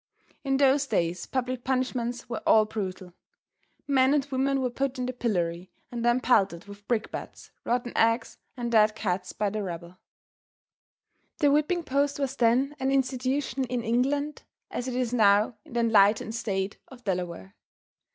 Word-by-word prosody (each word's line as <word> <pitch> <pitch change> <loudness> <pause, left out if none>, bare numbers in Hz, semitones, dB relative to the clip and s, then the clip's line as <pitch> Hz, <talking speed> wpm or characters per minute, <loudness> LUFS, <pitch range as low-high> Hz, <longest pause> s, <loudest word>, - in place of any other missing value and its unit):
In 270 -1 +1
those 275 0 +3
days 170 -5 -1
public 255 -1 -2
punishments 250 -2 -2
were 235 - -4
all 215 -1 +6
brutal. 190 -4 -5 0.7
Men 270 0 +4
and 280 -2 +1
women 270 +1 +1
were 255 -2 -1
put 270 +2 -2
in 250 - -2
the 255 - -3
pillory 180 -7 -2 0.2
and 240 -1 -4
then 240 +1 +3
pelted 195 -9 +2
with 205 0 -13
brick 230 -3 -1
bats, - - -8
rotten 245 0 -1
eggs 230 +1 +1 0.2
and 240 -1 -3
dead 215 -1 +4
cats, 185 -4 -2
by 210 -2 -1
the 215 +1 -3
rabble. 175 -1 -7 1.4
The 290 -3 +3
whipping 305 +4 +1
post 280 0 0
was 275 -2 -2
then 255 +4 +2
an 265 +1 0
institution 265 +1 0
in 245 -1 -3
England 275 +6 0 0.3
as 245 - -3
it 255 - -3
is 250 -1 -1
now 210 0 +4
in - - -14
the 240 - +1
enlightened 220 -1 +4
State 200 -4 -2
of 250 -2 -14
Delaware. 175 - -3
240 Hz, 160 wpm, -27 LUFS, 205-265 Hz, 1.4 s, all